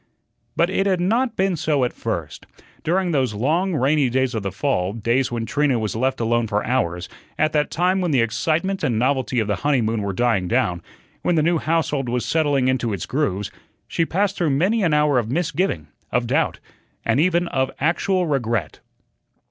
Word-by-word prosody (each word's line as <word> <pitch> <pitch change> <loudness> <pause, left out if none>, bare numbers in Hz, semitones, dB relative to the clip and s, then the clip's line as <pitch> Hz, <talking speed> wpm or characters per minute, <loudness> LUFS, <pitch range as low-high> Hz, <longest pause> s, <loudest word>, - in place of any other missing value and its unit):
But 170 +2 +2
it 195 +1 +1
had 185 -2 +2
not 230 +6 +1
been 190 -1 +1
so 150 -4 +1
at 125 - -1
first. 85 -11 -5 0.4
During 180 +2 +1
those 130 -8 0
long, 165 - +1
rainy 140 0 +2
days 130 +1 0
of 110 - -2
the 100 -1 -3
fall, 95 0 -1
days 115 +4 0
when 115 -1 -2
Trina 145 0 +1
was 110 -2 -2
left 130 +3 0
alone 120 0 +1
for 105 0 -1
hours, 90 -8 -1 0.3
at 155 0 +2
that 150 -1 +1
time 185 +3 +1
when 180 - 0
the 140 -4 +2
excitement 160 - 0
and 115 - +1
novelty 130 0 +1
of 110 - 0
the 105 -3 0
honeymoon 115 -6 +1
were 100 -1 -2
dying 105 -3 +1
down, 90 0 0 0.4
when 175 - +1
the 155 - +3
new 170 0 +2
household 150 -5 0
was 125 0 -1
settling 145 -5 +1
into 125 -4 0
its 95 - -4
grooves, 105 -9 -1 0.4
she 165 - 0
passed 195 +4 0
through 170 -4 +1
many 185 +11 +2
an 175 -5 +2
hour 150 -3 +3
of 110 -2 -3
misgiving, 150 - -1 0.2
of - - +1
doubt, - - 0 0.5
and 115 +3 +2
even 175 +1 +2
of 130 -1 0
actual 180 +4 +1
regret. 115 - -1
135 Hz, 190 wpm, -22 LUFS, 115-170 Hz, 0.5 s, the